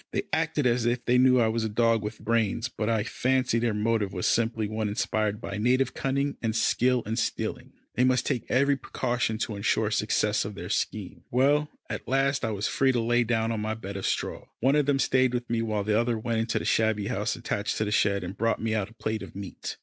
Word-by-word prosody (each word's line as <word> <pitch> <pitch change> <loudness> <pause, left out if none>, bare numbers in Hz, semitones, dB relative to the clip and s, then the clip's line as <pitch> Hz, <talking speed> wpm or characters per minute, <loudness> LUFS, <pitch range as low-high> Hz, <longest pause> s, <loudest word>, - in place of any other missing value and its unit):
They - - 0
acted 160 -3 +1
as 120 -1 +2
if 120 +1 -1
they 125 +1 +4
knew 130 0 +5
I 115 - +4
was 110 +1 0
a 110 - -1
dog 115 +1 +2
with 105 +1 -5
brains, 115 +1 0
but 110 -2 -3
I 110 -2 +1
fancy 130 0 +1
their 115 0 +1
motive 105 -2 0
was 90 -2 -3
simply 115 -2 +1
one 110 0 -2
inspired 105 0 -1
by 105 -2 -5
native 125 +3 +2
cunning 140 +1 -1
and 110 -2 -1
skill 125 +1 +2
in 110 +2 -3
stealing. 115 - -3 0.2
They 125 - +2
must 130 -1 +2
take 120 - -2
every 140 +2 +3
precaution 120 -3 -2
to 110 -1 -3
ensure 100 - +1
the - - -8
success - - +1
of - - -6
their - - -7
scheme. - - -2
Well, 145 +4 +2 0.2
at - - -6
last 135 +1 +1
I 110 - 0
was 105 -1 -2
free 135 -1 +2
to 120 - +1
lie 120 +1 +2
down 115 -1 0
on 115 - -2
my 110 +1 -2
bed 100 -3 -7
of 95 - -2
straw. - - -2
One 135 +4 +3
of 150 -2 +2
them 140 -1 +3
stayed 130 -2 +2
with 120 0 -3
me 115 -1 +1
while 110 -2 -1
the 105 +1 +2
other 120 -1 0
went 115 +1 -1
into 115 +1 0
the - - -3
shabby 110 -2 +1
house 105 +2 -1
attached 110 -3 -2
to 110 - 0
the 105 - -3
shed 100 -2 +2
and 90 +2 -6
brought 115 0 0
me 110 -1 -1
out 105 -2 -1
a 115 - -19
plate 110 -1 -3
of - - -10
meat. 100 -1 -7
115 Hz, 240 wpm, -27 LUFS, 110-125 Hz, 0.2 s, knew